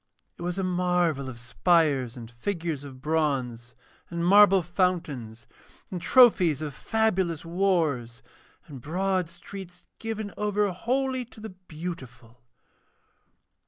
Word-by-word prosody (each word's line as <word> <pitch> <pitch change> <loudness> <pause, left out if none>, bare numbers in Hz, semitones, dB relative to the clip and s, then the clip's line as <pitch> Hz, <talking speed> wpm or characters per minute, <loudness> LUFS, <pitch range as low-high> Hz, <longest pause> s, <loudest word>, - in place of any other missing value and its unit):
It - - -14
was 175 +1 -3
a 195 - -1
marvel 180 -6 +1
of 125 - -8
spires 135 -1 +1
and 115 -1 -9
figures 160 +2 -3
of 130 -2 -11
bronze, 135 -7 -1 0.3
and 170 0 -2
marble 195 0 +7
fountains, 160 - -2 0.5
and 180 -2 -4
trophies 185 - +5
of 150 -2 -5
fabulous 190 - 0
wars, 165 -10 0 0.4
and 135 -4 -10
broad 185 +3 -1
streets 185 -1 -11
given 220 -2 -4
over 210 -1 +1
wholly 260 +6 -1
to 225 - -16
the 220 +1 -7
Beautiful. 150 -10 -9
170 Hz, 120 wpm, -27 LUFS, 135-195 Hz, 0.5 s, marble